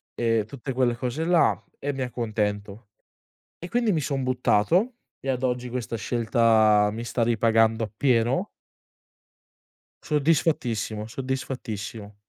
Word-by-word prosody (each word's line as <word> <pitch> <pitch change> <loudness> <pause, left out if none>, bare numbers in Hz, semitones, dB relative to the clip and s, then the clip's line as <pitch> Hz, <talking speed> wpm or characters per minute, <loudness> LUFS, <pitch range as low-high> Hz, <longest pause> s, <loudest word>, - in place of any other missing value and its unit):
ehm, 115 -2 +1
tutte 135 +2 -7
quelle 125 -2 +1
cose 125 +6 -3
là 165 - +3 0.2
e 145 - -2
mi 135 -1 -5
accontento. 105 -3 -3 0.7
E 175 - -8
quindi, 235 0 +1
mi 160 -5 +1
son 135 -2 -2
buttato 130 - +2 0.3
e 135 - -5
ad 130 -1 -1
oggi, 125 -1 -1
questa 120 -1 -4
scelta, 110 -2 +3
mi 115 +2 -5
sta 120 0 -2
ripagando 115 0 +3
appieno. 120 - +1 1.5
Soddisfattissimo, 140 -8 0
soddisfattissimo. 115 -5 -5
120 Hz, 115 wpm, -25 LUFS, 110-135 Hz, 1.5 s, là